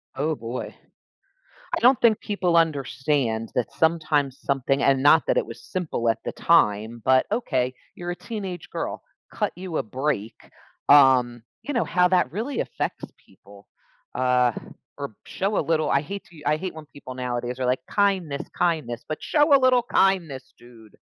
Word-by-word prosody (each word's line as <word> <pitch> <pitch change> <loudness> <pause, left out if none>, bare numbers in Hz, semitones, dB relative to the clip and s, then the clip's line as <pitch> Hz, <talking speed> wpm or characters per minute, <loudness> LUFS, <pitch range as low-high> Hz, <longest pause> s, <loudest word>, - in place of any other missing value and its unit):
Oh 155 +3 -1
boy. 120 0 -6 1.0
I - - -2
don't 250 0 +5
think 225 -3 +4
people 185 -5 0
understand 135 -6 0
that 125 - -1
sometimes 155 -4 +1
something- 135 0 0
and 135 -1 +3
not 155 +3 +6
that - - +1
it - - -1
was - - -10
simple 165 -10 -2
at 115 -1 +1
the - - -3
time- 110 -7 +2
but, 130 0 +4
"Okay, 130 - 0 0.2
you're 175 0 -6
a 175 - -4
teenage 190 -7 -6
girl, - - -4 0.3
cut - - -1
you 180 -3 -6
a - - 0
break," 115 -2 -3 0.6
um, 130 -4 +5 0.2
you 290 - -4
know, 235 - +1
how 180 0 +3
that 180 -7 +2
really 230 - -3
affects - - -4
people, - - -19 0.5
uh, 125 -1 +2 0.5
or 140 -1 -5
p - - -27
show 200 +2 -2
a - - +3
little 155 -2 +1
I 140 - +2
hate 200 +6 -7
to 175 - -18
u 150 - -13
I 150 - +3
hate 185 +2 -5
when 160 -1 -9
people 140 -3 -11
nowadays 125 0 -4
are - - 0
like, 125 +1 -1
"Kindness, 190 -8 0
kindness," 155 -9 -1
but 155 - -5
show 295 -1 +3
a - - +4
little 255 -1 +4
kindness, 175 - +1
dude! 115 -3 -17
150 Hz, 175 wpm, -24 LUFS, 125-180 Hz, 1.0 s, not